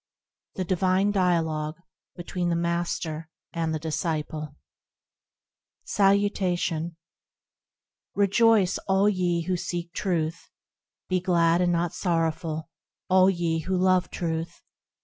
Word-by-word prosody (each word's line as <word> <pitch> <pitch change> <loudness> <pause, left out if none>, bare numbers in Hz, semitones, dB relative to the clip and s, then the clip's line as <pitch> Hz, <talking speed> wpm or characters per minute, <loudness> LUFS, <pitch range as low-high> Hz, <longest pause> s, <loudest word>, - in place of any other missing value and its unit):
The 185 - -1
Divine 185 +2 +2
Dialogue 165 -5 0 0.4
between 175 0 -3
the 170 - +1
Master 170 -2 -2 0.2
and 165 -2 -1
the 160 - -1
Disciple 155 -1 -3 1.3
Salutation 185 -4 +1 1.2
REJOICE, 205 -1 +3
all 195 +1 +3
ye 180 -4 +1
who 185 +2 -1
seek 175 -1 -4
Truth! 165 -4 -2 0.6
Be 185 0 +1
glad 170 -1 +3
and 175 -1 +2
not 170 0 0
sorrowful, 165 -2 -1 0.4
all 185 0 +6
ye 170 -3 0
who 185 +3 -1
love 185 0 +3
Truth! 165 0 -4
175 Hz, 105 wpm, -26 LUFS, 165-185 Hz, 1.3 s, all